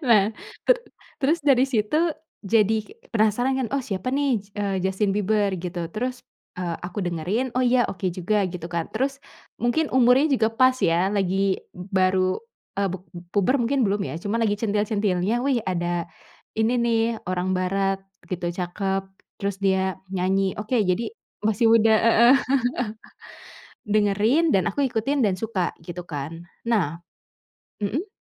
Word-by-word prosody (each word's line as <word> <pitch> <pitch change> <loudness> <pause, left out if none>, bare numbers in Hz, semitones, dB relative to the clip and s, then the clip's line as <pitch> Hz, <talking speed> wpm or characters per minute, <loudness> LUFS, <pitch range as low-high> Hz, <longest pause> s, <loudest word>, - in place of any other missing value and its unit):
Nah, 210 -4 +6 0.4
teru - - +4 0.4
terus 305 +5 +2
dari 270 -3 +5
situ 285 +8 +1 0.3
jadi 220 +1 +3 0.3
penasaran 230 +4 +2
kan, 255 - -1
"Oh, 275 - 0
siapa 200 +1 -3
nih, 275 -5 +2
s 200 - -15
eee, 200 -2 -1
Justin 190 +1 +1
Bieber?" 205 0 +1
Gitu. 175 0 -4
Terus, 250 +6 -3 0.3
eee, 175 -2 -3
aku 190 +2 -4
dengerin, 180 +9 -1
"Oh, 255 - +3
ya 245 0 +4
oke 185 0 -4
juga." 195 +2 +1
Gitu 175 -2 -6
kan. 170 -2 -2
Terus 275 +4 -1 0.4
mungkin 265 +6 +1
umurnya 260 +4 +4
juga 220 -4 +2
pas 255 +2 +4
ya, 180 0 +2
lagi 195 -1 +1 0.2
baru 185 0 +1 0.4
e - - +2
pub 185 -1 -4 0.3
puber 210 +7 +3
mungkin 260 +3 +1
belum 200 -2 +1
ya, - - -5
cuma 210 +3 -1
lagi 220 -3 +2
centil-centilnya, 205 0 0
"Wih, 270 -3 +2
ada 175 -1 -1 0.5
ini 220 +2 +2
nih 230 -1 +2 0.3
orang 185 +1 -1
barat 195 +1 0 0.3
gitu, 180 -1 -3
cakep, 190 +2 -2 0.4
terus 200 -1 -2
dia 190 -1 +1
nyanyi. 190 +1 +1
Oke, 220 +3 0
jadi" 185 +6 0 0.3
Masih 220 +2 +2
muda, 225 -1 +5
heeh. 235 +2 +6 1.5
Dengerin, 215 +10 +3
dan 185 -6 +2
aku 285 - 0
ikutin 260 +2 0
dan 190 -4 +1
suka, 205 -6 -1
gitu 175 +2 -7
kan. 160 +1 -6 0.2
Nah 175 -9 +1 0.8
Mhm? 290 - -1
205 Hz, 145 wpm, -24 LUFS, 185-240 Hz, 1.5 s, Nah